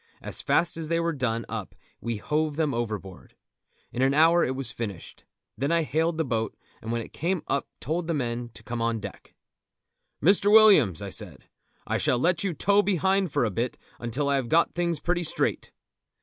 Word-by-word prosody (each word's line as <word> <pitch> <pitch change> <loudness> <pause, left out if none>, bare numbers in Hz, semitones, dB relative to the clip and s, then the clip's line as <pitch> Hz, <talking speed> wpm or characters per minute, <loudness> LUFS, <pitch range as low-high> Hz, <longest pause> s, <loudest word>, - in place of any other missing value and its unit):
As - - -2
fast 170 -1 +1
as 160 -1 -4
they 165 +1 +1
were 170 0 0
done 115 -5 -1
up - - -6 0.2
we 115 -2 -3
hove 150 +6 -1
them 155 -3 0
overboard. 105 -5 -5 0.6
In 125 - -3
an 135 +1 +3
hour 165 +3 +5
it 130 - -1
was 130 -4 -3
finished. 105 -6 -7 0.3
Then 140 +4 -1
I 170 -1 +3
hailed 160 +2 0
the 160 - 0
boat, 110 -3 -2 0.2
and 110 - -5
when 120 0 -1
it - - -14
came 175 +2 -1
up 140 - -1
told 165 +4 -2
the 165 - 0
men 120 -3 -3
to 110 - -13
come 120 +1 -4
on 115 -1 0
deck. - - -10 0.8
"Mr. 200 +5 +4
Williams," 195 - +6
I - - -6
said, - - -5 0.4
"I - - -1
shall 125 - +2
let 170 +6 +2
you 185 -4 -1
tow 200 +6 +3
behind 190 -2 +1
for 125 - +1
a 110 - -1
bit 120 +5 -2 0.2
until 120 +5 -2
I 140 0 +2
have 125 -3 -3
got 165 +5 +3
things 170 -2 -1
pretty 175 0 0
straight." 170 - -1
145 Hz, 200 wpm, -26 LUFS, 120-170 Hz, 0.8 s, Williams